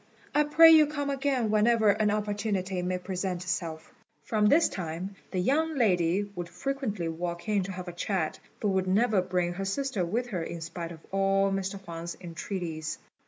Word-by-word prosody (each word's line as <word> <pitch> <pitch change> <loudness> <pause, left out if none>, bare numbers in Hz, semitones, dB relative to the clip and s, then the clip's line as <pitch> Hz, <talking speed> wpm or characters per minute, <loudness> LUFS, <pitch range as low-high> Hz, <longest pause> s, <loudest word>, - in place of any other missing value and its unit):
I 295 0 +4
pray 325 +2 +8
you 310 -2 +7
come 285 -1 -2
again 270 -5 0
whenever 220 0 +4
an 210 +1 +1
opportunity 205 -3 -1
may 180 +1 -1
present 180 -1 -3
itself." 170 -3 -4 0.3
From 210 -2 +2
this 310 +9 +5
time 180 +2 -5
the 185 - -4
young 305 - +1
lady 185 -6 +2
would 175 -1 -5
frequently 220 -5 -3
walk 170 +2 -4
in 210 -2 +2
to 195 - -5
have 185 -1 -7
a 175 - -5
chat, 175 -2 -2 0.2
but 210 - 0
would 190 -1 +1
never 210 +1 +3
bring 180 -1 -1
her 195 +2 -4
sister 240 -1 -1
with 235 +8 -2
her 185 -6 -2
in 165 0 -5
spite 165 +1 -5
of 160 -1 -12
all 195 0 +2
Mr. 195 0 -2
Huang's 170 0 -6
entreaties. 170 -2 -5
195 Hz, 180 wpm, -28 LUFS, 175-220 Hz, 0.3 s, pray